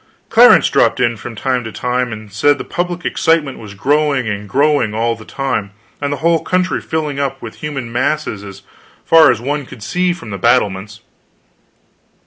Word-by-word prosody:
Clarence - - +7
dropped - - +2
in 120 -2 +2
from 115 +1 -9
time 125 +2 -1
to 110 - -6
time 125 +1 -2
and 110 -2 -9
said 145 +7 +3
the - - -5
public 175 0 -4
excitement 155 -5 +1
was 105 -2 -10
growing 140 +1 +1
and 105 -1 -4
growing 140 -5 +2
all 115 +1 0
the 110 - -13
time, 120 -8 -3 0.3
and 145 0 -1
the 145 - -2
whole 170 -1 +3
country 185 0 0
filling 150 -3 -3
up 140 -2 -2
with 115 - -9
human 135 -6 -5
masses 120 -3 -1
as 100 0 -11 0.4
far 160 -3 +7
as 120 -4 +2
one 145 +4 -2
could 115 -4 -12
see 180 - 0
from 115 -11 -7
the 100 - -5
battlements. 105 -4 +1
125 Hz, 180 wpm, -16 LUFS, 110-150 Hz, 0.4 s, Clarence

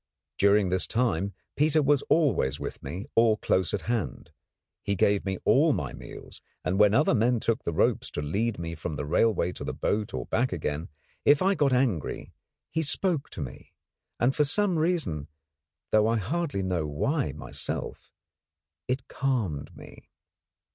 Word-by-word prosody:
During 100 -1 +4
this 95 0 0
time 100 -5 0 0.2
Peter 155 +2 +3
was 140 0 +3
always 120 - +2
with - - -6
me 95 +5 -6
or 115 -1 +4
close 95 -3 +1
at 100 - -2
hand. 110 - -3 0.5
He 100 - -1
gave 100 +2 +2
me 95 -1 -1
all - - +5
my - - -3
meals, - - -11 0.2
and 95 +2 0
when 105 0 +6
other 150 +2 +4
men 120 +1 +2
took 115 +2 -1
the - - -1
ropes 80 - +1
to - - -2
lead 105 +9 -1
me 85 -1 -4
from 80 -1 -5
the 75 - -4
railway 90 +4 +2
to - - -8
the - - -4
boat 105 0 -1
or - - -4
back 125 +3 0
again, 80 -2 -3 0.3
if 145 +4 +5
I 195 +1 +4
got 145 -7 +2
angry, 125 - 0 0.4
he 160 - 0
spoke 160 0 -1
to 85 - -7
me, 65 - -8 0.5
and 125 +3 +2
for 150 - +4
some 180 +3 +1
reason, 155 - 0 0.6
though 110 0 +4
I 115 +1 +2
hardly 130 - -2
know 90 -4 -1
why 135 - 0
myself, 75 - -5 0.8
it 130 +1 -2
calmed 110 - -2
me. - - -14
110 Hz, 170 wpm, -27 LUFS, 90-135 Hz, 0.8 s, when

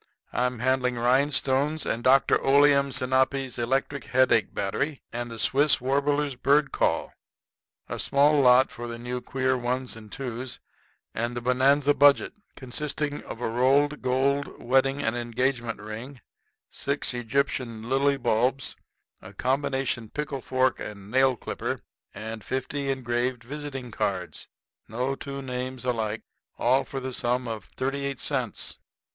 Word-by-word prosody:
"I'm 125 +1 0
handling 125 +1 +1
rhinestones 135 +4 +2
and 115 - -2
Dr. 130 +2 +4
Oleum 140 0 +5
Sinapi's 130 0 0
Electric 135 +3 -1
Headache 125 -4 +3
Battery 120 +9 -2
and 120 0 -3
the 115 - -7
Swiss 140 +6 +4
Warbler's 140 +2 +1
Bird 140 +3 +2
Call, - - 0 0.7
a - - -5
small 145 +2 +4
lot 125 0 +6
of 120 0 -4
the 115 - -5
new 125 +1 -4
queer 130 0 0
ones 125 0 -2
and 110 -2 -12
twos, 125 -1 -5 0.5
and 120 +2 -2
the - - -1
Bonanza 135 +4 +3
Budget, 145 0 +5 0.2
consisting 145 +3 -3
of 115 - -8
a - - 0
rolled 135 +5 +2
gold 135 +2 0
wedding 135 +3 +2
and 115 +1 0
engagement 120 -1 -1
ring, 110 +6 -8 0.5
six 140 -1 -1
Egyptian 120 -2 -2
lily 140 +2 +2
bulbs, 125 +2 0 0.5
a 95 +2 -11
combination 135 -2 -1
pickle 140 -1 -4
fork 130 0 +1
and 100 0 -8
nail 130 0 +4
clipper, - - -4 0.3
and 110 0 -7
fifty 135 +2 -3
engraved 125 -1 -1
visiting 135 -2 -6
cards 95 -4 -3 0.4
no 125 +5 -2
two 140 0 -6
names 125 -1 -5
alike 110 -3 -1 0.3
all 130 +3 +3
for 135 - -5
the 130 0 -5
sum 125 +1 0
of 110 -4 -5
38 140 +1 -3
cents." - - -2
130 Hz, 135 wpm, -26 LUFS, 120-140 Hz, 0.7 s, lot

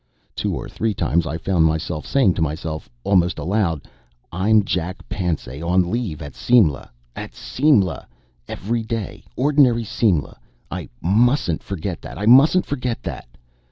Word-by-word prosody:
Two - - -1
or - - -5
three 110 -2 -2
times 85 -1 +1
I 80 - -3
found 85 -1 +1
myself 80 0 -1
saying 130 -10 +3
to 85 - -3
myself 80 -1 -3
almost 90 -3 +2
aloud: 85 -1 -1 0.4
"I'm 105 +4 +3
Jack 90 0 -3
Pansay 80 -7 -3
on 90 +1 +1
leave 105 -10 -3
at 70 -2 -8
Simla 100 - +2 0.3
at - - -7
Simla! 110 - +1 0.4
Everyday, 115 -1 -4
ordinary 130 -4 +3
Simla. 100 - 0 0.3
I - - -5
mustn't 105 - +2
forget 95 -2 -5
that - - -9
I 105 - -3
mustn't 140 +10 +6
forget 125 -4 -3
that." - - -6
95 Hz, 140 wpm, -21 LUFS, 80-115 Hz, 0.4 s, mustn't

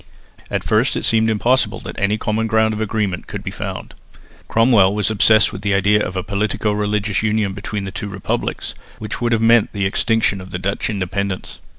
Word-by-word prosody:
At - - -2
first - - +2
it - - -3
seemed 110 0 +3
impossible 115 0 +1
that - - -7
any 100 +2 +1
common 110 +1 -1
ground 110 0 +2
of 110 - -4
agreement 105 -4 -2
could - - -6
be - - -4
found. - - -6 0.5
Cromwell 110 -4 +4
was 105 +1 0
obsessed 110 0 +4
with - - -7
the 100 -1 +1
idea 105 +2 +3
of 90 - -4
a 95 - -2
politico 105 +2 -1
religious 105 -1 -1
union 105 -2 0
between 100 +1 -4
the 95 - -5
two 105 - -5
republics, 100 -1 -3 0.2
which 110 +2 -6
would 120 0 +1
have 115 -1 +2
meant 115 -1 +4
the 100 -2 -1
extinction 100 0 +1
of 95 -1 -6
Dutch 100 +4 -2
independence. 100 -1 -3
105 Hz, 195 wpm, -19 LUFS, 100-110 Hz, 0.5 s, Cromwell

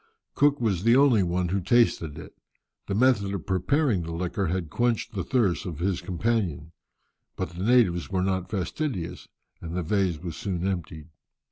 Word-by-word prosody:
Cook 145 0 +3
was 105 -7 0
the 115 +4 +4
only 135 -6 +5
one 90 0 0
who 95 +2 0
tasted 95 -7 +2
it. - - -10 0.5
The 100 - -1
method 105 -4 +2
of 95 - -6
preparing 100 - +1
the 85 0 -6
liquor 90 +3 -2
had 85 -2 -2
quenched 120 0 0
the 95 -4 -2
thirst 95 - 0
of 85 -4 -5
his 90 +2 -1
companions, 90 -4 -1 0.6
but - - -3
the 90 +2 -6
natives 105 -7 +3
were 95 -2 0
not 95 -1 -1
fastidious, 90 - -3 0.3
and 85 0 -6
the 90 - -1
vase 95 -1 0
was 85 0 -6
soon 95 -3 -3
emptied. 85 -4 -4
95 Hz, 170 wpm, -26 LUFS, 85-110 Hz, 0.6 s, only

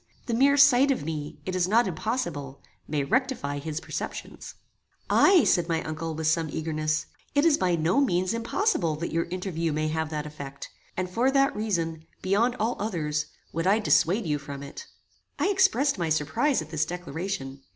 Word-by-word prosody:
The 235 - -2
mere 275 +4 +4
sight 280 -1 +6
of 260 - 0
me, 150 -2 -5
it 185 - -3
is 180 -1 +2
not 230 +5 +4
impossible, 175 - -3 0.3
may 145 -2 -1
rectify 145 - -1
his 155 +1 -4
perceptions." - - -6 0.6
"Ay," 370 -6 +6
said 175 -2 +2
my 165 -1 0
uncle, 155 +1 -4
with 160 0 -4
some 160 0 +2
eagerness; 155 0 -1 0.3
"it 285 +2 +4
is 325 -3 +6
by 180 -6 +1
no 170 - +2
means 185 -4 +1
impossible 230 - 0
that 170 +3 -4
your 165 +1 0
interview 175 -2 -3
may 155 +1 -1
have 160 0 -2
that 150 -1 -3
effect; 140 -2 -8 0.3
and 185 0 -1
for 235 +8 +1
that 275 0 +3
reason, 170 -7 -2 0.2
beyond 220 +6 +2
all 225 +3 0
others, 155 -7 -2 0.3
would 165 +2 -1
I 200 +3 +5
dissuade 210 -1 +2
you 150 -2 0
from 140 -1 -8
it." 465 - -9 0.5
I - - +1
expressed 365 - +3
my 170 -2 0
surprize 160 - +1
at 155 - -14
this 155 -1 +1
declaration. 170 -5 -5
170 Hz, 180 wpm, -26 LUFS, 155-230 Hz, 0.6 s, sight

